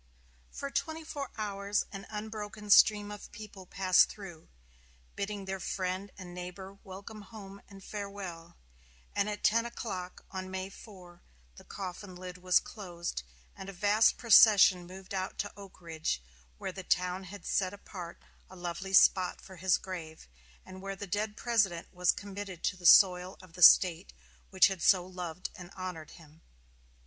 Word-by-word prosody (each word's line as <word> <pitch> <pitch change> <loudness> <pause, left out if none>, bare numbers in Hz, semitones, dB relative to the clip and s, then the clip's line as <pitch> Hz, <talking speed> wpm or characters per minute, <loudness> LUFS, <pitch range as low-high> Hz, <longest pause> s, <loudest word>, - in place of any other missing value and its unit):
For 280 - -6
twenty 320 +2 -2
four 290 -3 -5
hours 200 -1 -1
an 195 -1 -8
unbroken 210 -1 -6
stream 205 0 +6
of 210 - -9
people 210 -3 -11
passed 185 0 +4
through, 175 -6 -10 0.7
bidding 200 -1 -4
their 190 0 -4
friend 185 +2 -3
and 180 -2 -9
neighbor 180 +2 -8
welcome 200 +3 -9
home 200 -2 -11
and 195 -1 -13
farewell; 195 -5 -7 0.6
and 205 +1 +1
at 210 - -5
ten 230 +2 +4
o'clock 195 -6 -6
on 185 0 -5
May 190 +1 -5
4, 180 -5 -14 0.3
the - - -14
coffin 185 0 -7
lid 180 0 -8
was 180 0 +4
closed, 175 - -6 0.3
and 190 - -8
a - - -7
vast 205 +4 +3
procession 200 -6 +7
moved 190 +1 -10
out 190 0 -3
to 205 - -3
Oak 200 -2 -13
Ridge, 160 - -3 0.4
where - - -4
the 190 - -7
town 180 +1 0
had 190 -1 -10
set 185 -2 0
apart 185 -4 -9 0.3
a 185 - -12
lovely 180 +2 -5
spot 185 -1 +5
for 190 - -13
his 185 +1 +3
grave, 165 - -8 0.4
and 185 0 -11
where 195 0 -5
the 205 - -6
dead 210 +2 -2
President 200 -8 0
was 180 0 +3
committed 200 -3 -8
to - - 0
the 180 -1 0
soil 180 -1 +6
of 185 -3 -16
the 180 - -10
State 180 +1 +7 0.4
which 190 -2 +6
had 195 -4 0
so 180 0 +4
loved 180 -1 -6
and 180 -3 -11
honored 180 -4 -6
him. 160 -1 -16
190 Hz, 160 wpm, -31 LUFS, 180-205 Hz, 0.7 s, procession